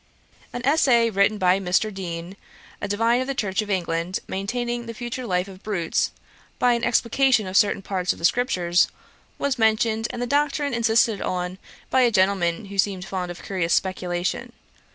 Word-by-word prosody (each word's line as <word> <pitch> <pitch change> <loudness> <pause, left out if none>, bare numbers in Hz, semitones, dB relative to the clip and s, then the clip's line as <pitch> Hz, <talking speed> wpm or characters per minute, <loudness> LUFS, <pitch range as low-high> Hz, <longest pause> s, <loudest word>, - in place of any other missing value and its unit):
An 245 +1 -5
essay, 255 -6 +4
written 200 +1 +2
by 185 -1 +3
Mr. 195 +3 0
Deane, 175 -1 -6 0.5
a - - -2
divine 230 +4 +2
of 260 - -3
the 275 - -2
Church 205 -5 0
of 210 - -7
England, 175 -1 -1
maintaining 240 +4 -3
the 230 - -6
future 240 +2 -5
life 180 0 0
of 190 -1 -12
brutes, 185 -6 -1 0.5
by 245 -1 +3
an 235 0 -2
explication 245 -1 +3
of 185 0 -6
certain 200 -2 +3
parts 185 -2 -1
of - - -6
the 170 - -2
scriptures, 180 -6 +2 0.5
was 275 -3 -1
mentioned, 220 0 +2
and - - -6
the 245 - -1
doctrine 285 +1 0
insisted 230 -2 +2
on 180 +1 -3 0.3
by 260 - +4
a 245 - +5
gentleman 190 -2 +1
who 200 0 -7
seemed 190 -2 +1
fond 185 -2 -4
of 175 - -8
curious 180 -4 0
speculation. 180 -1 -2
205 Hz, 175 wpm, -23 LUFS, 185-240 Hz, 0.5 s, a